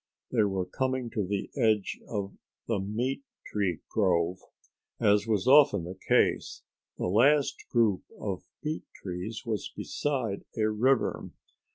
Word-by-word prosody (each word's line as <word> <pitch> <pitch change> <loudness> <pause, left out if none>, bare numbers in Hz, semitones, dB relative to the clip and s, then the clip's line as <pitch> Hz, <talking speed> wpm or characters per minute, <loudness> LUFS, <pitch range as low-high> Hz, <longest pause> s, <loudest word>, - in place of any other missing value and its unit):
They 120 - +3
were 95 -3 0
coming 130 +4 -2
to 105 - -1
the 100 0 -2
edge 110 -6 +1
of 100 -3 -4 0.3
the 115 -4 0
meat 115 - -2 0.2
tree 95 -6 -1
grove. 90 -3 +1 0.6
As 105 +1 +3
was 105 -3 +1
often 135 - +6
the 90 +2 -6
case, - - +2 0.3
the - - -2
last 135 +8 +3
group 110 -6 +3 0.2
of 95 -3 -3 0.2
meat 155 +1 -2
trees 95 +4 -5
was 110 -4 -3
beside 130 -9 -2
a 110 -1 +2
river. 125 +4 +1
110 Hz, 135 wpm, -29 LUFS, 95-125 Hz, 0.6 s, often